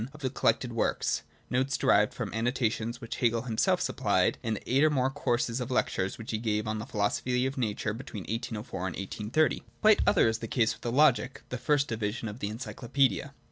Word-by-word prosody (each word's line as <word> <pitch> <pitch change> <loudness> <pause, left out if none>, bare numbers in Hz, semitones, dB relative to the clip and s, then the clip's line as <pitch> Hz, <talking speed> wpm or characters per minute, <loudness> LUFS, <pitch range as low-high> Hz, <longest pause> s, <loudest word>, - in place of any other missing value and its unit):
of 150 - -13
the 130 -2 -1
Collected 125 -2 +1
works 115 - 0
— - - -34
notes 130 +2 +1
derived - - +4
from - - -5
the - - -6
annotations 115 0 -1
which 115 -3 -6
Hegel 115 -2 +1
himself 115 -3 +1
supplied - - +1
in 110 -1 -1
the - - -8
eight 135 +3 +5
or 155 - +6
more 135 -3 +1
courses 125 -3 -1
of 125 - -4
lectures 95 -6 0
which 115 - -6
he 110 - -1
gave 110 -1 -1
on 110 0 -2
the 110 - -6
Philosophy 125 +3 0
of 135 +1 -2
Nature 110 -3 -1
between 110 -4 -7
1804 115 0 -4
and 95 -1 -3
1830. 105 +10 0 0.2
Quite 215 0 +6
other 195 - +5
is 110 0 0
the 115 - -5
case 110 -1 +2
with - - -16
the 120 - -2
Logic— 135 -1 +3
the 125 - -4
first 140 +2 +2
division 110 +1 -3
of 105 +3 -7
the 100 - -2
Encyclopaedia. 120 -1 -1
120 Hz, 215 wpm, -29 LUFS, 110-130 Hz, 0.2 s, or